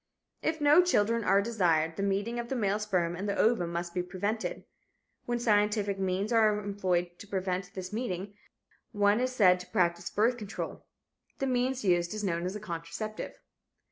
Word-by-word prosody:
If 320 0 -1
no 295 +4 +6
children 230 - +2
are 200 0 +4
desired, 170 -8 +1
the - - -4
meeting 200 +4 -1
of 235 0 -5
the 265 - -1
male 205 -3 +1
sperm 180 -5 0
and 200 +3 -3
the 200 - 0
ovum 215 -7 +2
must 170 0 -3
be 180 - 0
prevented. 200 +5 -3 0.6
When 240 0 0
scientific 210 -3 +1
means 190 +4 -1
are 215 -2 +4
employed 185 -4 -1
to 205 - -10
prevent 185 -2 -3
this 185 +1 -6
meeting, 205 -4 -3 0.6
one 205 +1 +3
is 255 +1 0
said 185 -7 +5
to 180 - -9
practice 175 -4 0
birth 230 +4 +2
control. 210 -3 -6 0.5
The 270 - -1
means 255 -1 0
used 175 +1 +2
is 215 - -4
known 170 -2 -1
as 185 - -4
a - - -4
contraceptive. 175 +3 -5
205 Hz, 175 wpm, -30 LUFS, 180-225 Hz, 0.6 s, no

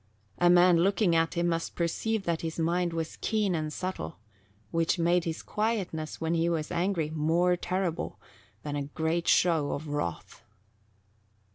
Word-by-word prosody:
A 175 - +5
man 175 0 +6
looking 195 -1 +3
at 165 0 +1
him 170 0 +1
must 165 0 -2
perceive 195 +5 -1
that 170 -2 -1
his 165 -1 -4
mind 170 +1 +1
was 165 -1 -4
keen 210 -4 +1
and 155 -2 -2
subtle, 150 - -5 0.5
which 165 +2 +1
made 170 +1 +2
his 165 -1 -4
quietness, 205 -8 -2
when 165 0 -1
he 165 0 +2
was 160 -3 -2
angry, 170 -3 0
more 165 +3 +2
terrible 180 -1 -2 0.4
than 145 -1 -4
a 145 - -1
great 160 +4 -2
show 160 -5 +3
of 155 +2 -5
wrath. 145 - -4
170 Hz, 155 wpm, -29 LUFS, 160-180 Hz, 0.5 s, man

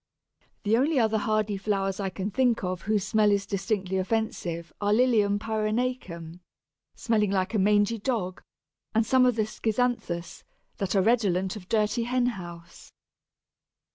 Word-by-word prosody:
The 215 +1 +3
only 285 +4 +2
other 220 -3 +2
hardy 215 -1 0
flowers 195 -1 -1
I 195 -1 -1
can 195 +2 -4
think 245 -1 +1
of 185 0 -2
whose 210 -1 0
smell 210 +1 +3
is 200 -1 +1
distinctly 195 -2 -2
offensive 185 -5 -2
are 205 0 +1
Lilium 215 -3 +3
pyrenaicum, 215 -6 -3 0.6
smelling 215 -3 +1
like 190 +1 0
a 215 - +2
mangy 205 +3 +3
dog, 200 -6 -2 0.5
and 225 0 +3
some 255 +2 +4
of 250 - +2
the 220 - +1
Schizanthus, 215 -6 -2 0.3
that 195 0 -2
are 190 - +4
redolent 195 -5 +1
of 190 -4 -10
dirty 220 +2 +1
hen 250 0 +1
house. 175 -7 -7
210 Hz, 145 wpm, -27 LUFS, 190-225 Hz, 0.6 s, some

